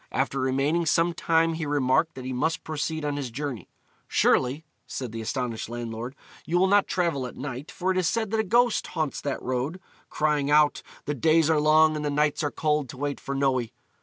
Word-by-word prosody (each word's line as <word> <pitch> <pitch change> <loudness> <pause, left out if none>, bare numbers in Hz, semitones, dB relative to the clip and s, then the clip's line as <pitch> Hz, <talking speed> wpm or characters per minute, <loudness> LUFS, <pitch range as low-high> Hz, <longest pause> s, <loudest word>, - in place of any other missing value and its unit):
After 135 +1 -1
remaining 135 +6 +1
some 165 +2 +3
time 165 0 +2
he 160 -2 -3
remarked 145 +3 +1
that 130 -1 -8
he 130 - -3
must 160 +6 -1
proceed 155 0 -3
on 145 -1 -1
his 135 -3 -3
journey. 125 - -5 0.4
"Surely," 135 +5 +2 0.2
said 125 -4 -5
the 115 0 -5
astonished 115 -1 -3
landlord, 120 +1 -5 0.3
"you 175 - 0
will 185 - +4
not 200 +1 +4
travel 165 -8 0
at - - -11
night, 135 +1 -6
for 185 +1 -1
it 185 - +1
is 180 - +2
said 220 -3 -1
that 220 - +1
a - - +3
ghost 235 +3 +2
haunts 155 -3 -3
that 140 -2 -3
road, 130 +8 -2 0.3
crying 150 -2 0
out, 150 0 +4 0.2
The 145 - -1
days 160 +3 +3
are 155 - +3
long 155 +1 +5
and 150 - -3
the 145 - 0
nights 150 0 +1
are 150 - 0
cold 150 -3 0
to 130 - -9
wait 145 +1 -3
for 140 - -5
Noe." 135 -2 +2
150 Hz, 210 wpm, -26 LUFS, 130-160 Hz, 0.4 s, long